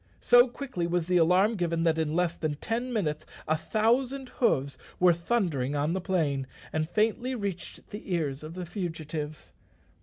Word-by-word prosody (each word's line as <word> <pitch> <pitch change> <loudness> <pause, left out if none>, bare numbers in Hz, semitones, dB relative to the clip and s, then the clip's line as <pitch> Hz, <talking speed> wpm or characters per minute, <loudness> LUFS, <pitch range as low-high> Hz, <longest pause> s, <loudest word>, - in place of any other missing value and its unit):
So 245 +1 +7
quickly 240 -9 -4
was 175 -1 0
the 180 +1 +2
alarm 180 +6 +4
given 170 -2 0
that 160 -1 +2
in 155 -1 0
less 175 -1 +1
than 155 -2 -2
ten 235 - -3
minutes 155 -9 -1 0.2
a 155 - +3
thousand 245 - 0
hoofs 140 - +1 0.2
were 180 -1 +6
thundering 170 - 0
on 145 +3 0
the 190 - -1
plain, 150 -8 0 0.3
and 155 0 -1
faintly 225 +6 +1
reached 200 -6 -5
the 205 -2 -7
ears 150 -6 -1
of 155 +2 -8
the 180 -1 -5
fugitives. 160 -4 -5
175 Hz, 170 wpm, -28 LUFS, 155-215 Hz, 0.3 s, So